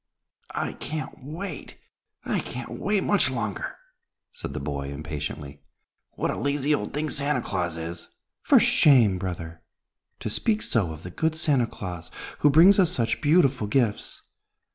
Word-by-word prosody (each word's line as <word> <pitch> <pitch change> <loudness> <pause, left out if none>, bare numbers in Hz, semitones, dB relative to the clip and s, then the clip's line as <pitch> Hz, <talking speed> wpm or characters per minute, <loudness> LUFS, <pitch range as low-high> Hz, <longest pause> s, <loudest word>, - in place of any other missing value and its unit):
"I - - -2
can't 150 -4 -6
wait! 160 +3 -7 0.5
I - - 0
can't 120 0 -6
wait 205 -1 0
much 205 -9 +3
longer," 110 -6 -3 0.6
said - - -6
the - - -2
boy, 70 0 -4
impatiently. 75 -1 -6 0.5
"What - - -1
a - - -4
lazy 145 +1 +1
old 105 -8 -1
thing 150 +1 -2
Santa 145 +1 +1
Claus 90 -4 -2
is!" 85 +1 -6 0.3
"For - - +6
shame, 115 -11 +5
brother, 85 -3 -5 0.6
to - - -4
speak 215 - 0
so 100 -8 +1
of 80 0 -9
the 90 - -7
good 160 - 0
Santa 145 -7 +2
Claus, 90 -6 -7 0.3
who 145 - +5
brings 175 +8 +7
us 180 -3 +4
such 115 -9 -1
beautiful 145 -7 +3
gifts. 110 -1 0
120 Hz, 150 wpm, -26 LUFS, -, 0.6 s, brings